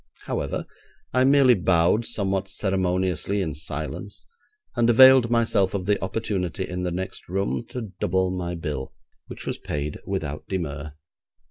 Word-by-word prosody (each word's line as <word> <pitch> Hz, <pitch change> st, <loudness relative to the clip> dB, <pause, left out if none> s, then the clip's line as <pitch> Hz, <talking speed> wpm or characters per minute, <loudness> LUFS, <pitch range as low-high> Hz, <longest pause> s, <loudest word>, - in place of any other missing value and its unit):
However, -, -, -3 dB, 0.5 s
I 130 Hz, +1 st, +4 dB
merely 135 Hz, -2 st, +6 dB
bowed 90 Hz, +3 st, +2 dB
somewhat 95 Hz, -4 st, -1 dB
ceremoniously 95 Hz, -1 st, 0 dB
in 80 Hz, -6 st, -1 dB
silence, 80 Hz, +6 st, -6 dB, 0.5 s
and 120 Hz, 0 st, +3 dB
availed 130 Hz, 0 st, +8 dB
myself 110 Hz, -5 st, +2 dB
of 95 Hz, -2 st, -2 dB
the 100 Hz, -1 st, +1 dB
opportunity 95 Hz, -3 st, -2 dB
in 90 Hz, 0 st, -4 dB
the 90 Hz, -, -1 dB
next 95 Hz, +1 st, -5 dB
room 95 Hz, +5 st, -1 dB
to 115 Hz, -6 st, -6 dB
double 95 Hz, +1 st, +1 dB
my 90 Hz, -1 st, -3 dB
bill, 75 Hz, -5 st, -4 dB, 0.3 s
which -, -, -9 dB
was -, -, -3 dB
paid 75 Hz, 0 st, -4 dB
without 75 Hz, -6 st, -4 dB
demur. 75 Hz, -5 st, -4 dB
95 Hz, 140 wpm, -24 LUFS, 85-105 Hz, 0.5 s, availed